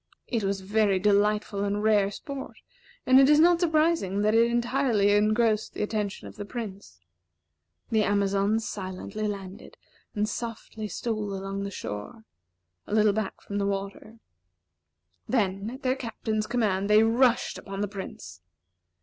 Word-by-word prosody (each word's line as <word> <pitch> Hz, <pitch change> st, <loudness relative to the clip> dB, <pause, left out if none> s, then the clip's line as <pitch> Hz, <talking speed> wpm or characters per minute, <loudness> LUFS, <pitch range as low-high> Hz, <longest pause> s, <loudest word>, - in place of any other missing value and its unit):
It 230 Hz, -4 st, -2 dB
was 195 Hz, 0 st, -1 dB
very 205 Hz, 0 st, +2 dB
delightful 205 Hz, +1 st, +1 dB
and 205 Hz, +1 st, -1 dB
rare 210 Hz, -2 st, +3 dB
sport, 270 Hz, +6 st, -8 dB, 0.5 s
and 260 Hz, +1 st, +7 dB
it 270 Hz, +1 st, +6 dB
is 300 Hz, 0 st, +6 dB
not 340 Hz, +1 st, +5 dB
surprising 315 Hz, -, +1 dB
that 215 Hz, +1 st, +3 dB
it 230 Hz, +1 st, +4 dB
entirely 240 Hz, -3 st, +2 dB
engrossed 215 Hz, +1 st, +2 dB
the -, -, -1 dB
attention 210 Hz, -1 st, -3 dB
of -, -, -12 dB
the 205 Hz, -, -4 dB
Prince. 200 Hz, -, -8 dB, 0.9 s
The 220 Hz, -1 st, +3 dB
Amazons 200 Hz, +2 st, +1 dB
silently 195 Hz, +2 st, -5 dB
landed, 200 Hz, 0 st, -7 dB, 0.4 s
and 210 Hz, 0 st, 0 dB
softly 220 Hz, -1 st, -5 dB
stole 210 Hz, -2 st, -3 dB
along 195 Hz, +1 st, -4 dB
the -, -, -3 dB
shore, 145 Hz, -, -7 dB, 0.6 s
a 205 Hz, -, -1 dB
little 210 Hz, -1 st, +4 dB
back 215 Hz, -2 st, -3 dB
from 205 Hz, 0 st, -4 dB
the 200 Hz, -, 0 dB
water. 200 Hz, +3 st, -5 dB, 1.1 s
Then, 200 Hz, -4 st, 0 dB
at 260 Hz, +4 st, -9 dB
their 255 Hz, 0 st, +1 dB
Captain's 220 Hz, -3 st, -3 dB
command, 210 Hz, -4 st, 0 dB
they 210 Hz, +1 st, +6 dB
rushed 240 Hz, +2 st, +2 dB
upon 195 Hz, 0 st, -6 dB
the 205 Hz, -, 0 dB
Prince. 190 Hz, -, -9 dB
210 Hz, 150 wpm, -27 LUFS, 200-230 Hz, 1.1 s, and